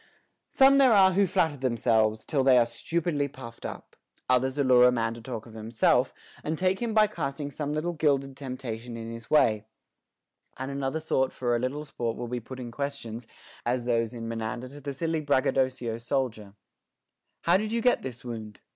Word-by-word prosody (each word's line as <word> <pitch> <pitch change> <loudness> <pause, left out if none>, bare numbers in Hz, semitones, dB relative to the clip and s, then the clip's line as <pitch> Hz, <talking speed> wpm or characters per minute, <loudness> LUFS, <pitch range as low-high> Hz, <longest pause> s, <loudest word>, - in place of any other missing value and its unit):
Some 275 +1 +6
there 260 -4 +6
are 190 -2 +6
who 195 +1 +3
flatter 160 -3 +1
themselves, 110 -4 +1
till 140 -3 +1
they 130 -1 +6
are 120 - +5
stu 165 +8 -3
pidly 145 -5 -1
puffed 115 -4 -8
up; - - -10 0.3
others 130 +2 +2
allure 130 -3 +6
a - - +5
man 115 -2 0
to 115 - -10
talk 115 -2 -6
of 115 - -13
himself, 110 +1 +2 0.3
and 155 +1 -2
take 185 +2 +1
him 230 -2 -2
by 215 -1 +7
casting 145 -7 -4
some 145 +1 -3
little 155 +3 -1
gilded 140 -4 +1
temptation 125 -3 -6
in 115 0 -6
his 115 0 -9
way; 110 -8 +4 0.9
and 130 +1 -4
another 140 +2 -2
sort 135 -4 0
for 120 -2 -1
a - - 0
little 140 +5 -3
sport 120 -5 -3
will 120 - -4
be 125 +1 -3
putting 125 +1 -8
questions, 120 -4 -5 0.4
as 120 0 -1
those 115 -2 +1
in 115 -2 -6
Menander 115 +2 -4
to 145 +2 -11
the 140 +1 -4
silly 160 +3 -2
braggadocio 130 -4 +1
soldier: 115 -4 -2 0.9
How 170 +2 +4
did 215 +2 -3
you 230 0 -1
get 250 - +3
this 125 -2 -7
wound 110 -4 -7
130 Hz, 190 wpm, -27 LUFS, 115-150 Hz, 0.9 s, by